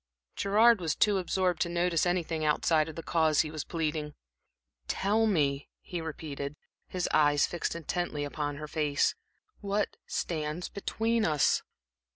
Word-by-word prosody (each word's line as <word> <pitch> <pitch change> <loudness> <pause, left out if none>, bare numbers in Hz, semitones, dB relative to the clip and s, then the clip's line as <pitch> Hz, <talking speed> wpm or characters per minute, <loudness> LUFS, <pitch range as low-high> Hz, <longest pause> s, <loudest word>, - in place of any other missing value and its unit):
Gerard 215 +2 +4
was 160 -3 0
too 205 -2 +3
absorbed 180 -1 0
to 170 - +1
notice 170 -1 +1
anything 170 -3 -1
outside 155 +1 +2
of 155 - -9
the 165 - -6
cause 160 -2 +3
he 155 - -4
was 155 -2 -4
pleading. 155 -2 -3 0.7
"Tell 215 +3 +2
me," 145 -8 +1
he 175 -3 -5
repeated, 150 -3 -5 0.3
his 180 -1 -2
eyes 145 -1 +4
fixed 175 - -3
intently 170 -2 -2
upon 145 0 -3
her 150 +1 -6
face, 150 -2 +1 0.5
"what 205 0 -1
stands 155 +1 -3
between 225 +3 -1
us?" 150 -6 +3
160 Hz, 145 wpm, -30 LUFS, 150-180 Hz, 0.7 s, Gerard